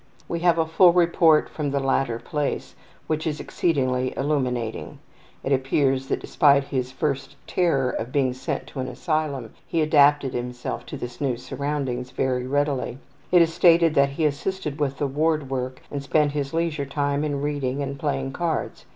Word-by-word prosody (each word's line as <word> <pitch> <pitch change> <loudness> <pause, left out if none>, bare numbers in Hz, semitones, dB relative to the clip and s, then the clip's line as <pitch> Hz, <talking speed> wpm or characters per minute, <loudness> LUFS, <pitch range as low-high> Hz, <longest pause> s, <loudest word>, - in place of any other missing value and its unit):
We 170 - -2
have 170 -1 +3
a 165 - +2
full 170 +2 +5
report 170 -3 +4
from 150 -2 -3
the 140 0 0
latter 135 -3 0
place 145 +4 -3 0.3
which 155 +1 -2
is 150 -1 -2
exceedingly 130 -6 0
illuminating. 125 -6 -2 0.5
It 135 - +1
appears 135 0 +1
that - - -1
despite 140 -2 +4
his 130 -2 -3
first 135 0 -2
terror 140 -8 +1
of 120 +3 -4
being 130 -3 +1
sent 130 - -4
to 135 - -8
an 130 - -2
asylum 140 -3 -2 0.2
he 165 - -1
adapted 145 -3 +4
himself 125 0 -4
to - - -6
his 120 +2 -7
new 130 -4 0
surroundings 135 -2 -3
very 125 0 -1
readily. 140 -3 0 0.3
It 175 -1 +7
is 165 0 -2
stated 170 -2 +5
that 140 -1 +4
he 145 +3 -1
assisted 150 +1 -2
with 135 -2 -1
the 145 - 0
ward 150 0 0
work 130 -1 -3
and 145 - -3
spent 145 +1 +2
his 140 -2 -3
leisure 165 -4 -1
time 145 +1 -1
in 145 -2 -2
reading 145 -2 -1
and 140 0 -5
playing 65 - -2
cards. - - -3
140 Hz, 175 wpm, -24 LUFS, 130-155 Hz, 0.5 s, It